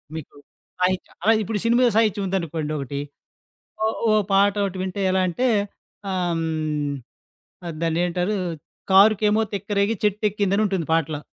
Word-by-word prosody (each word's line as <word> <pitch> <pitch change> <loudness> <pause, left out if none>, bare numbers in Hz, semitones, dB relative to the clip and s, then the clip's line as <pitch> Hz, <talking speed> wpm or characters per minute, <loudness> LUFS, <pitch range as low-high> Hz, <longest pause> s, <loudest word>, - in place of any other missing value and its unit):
మీకు 160 -3 -8 0.5
సాహిత్యం. 185 0 0
అలాగె 220 +1 +4
ఇప్పుడు 210 0 -2
సినిమా 240 +2 +4
సాహిత్యం 210 -3 +2
ఉందనుకోండి 165 -5 -2
ఒకటి, 140 0 -4 0.8
ఓ - - +3 0.2
ఓ - - +4 0.2
పాట 200 +1 +4
ఒకటి 195 -1 -3
వింటే 190 +1 -4
ఎలా 190 0 +2
అంటే 245 +9 0 0.6
ఆహ్, 180 -2 0
హ్మ్, 155 +1 -5
దాన్ని 165 0 0
ఏంటారు 180 +3 -1 0.6
కారుకెమో 210 +2 +5
తిక్కరేగి 200 +2 0
చెట్టెక్కిందని 205 -1 +1
ఉంటుంది 190 -5 -1
పాటలో. 155 -2 0
190 Hz, 125 wpm, -23 LUFS, 165-210 Hz, 0.8 s, కారుకెమో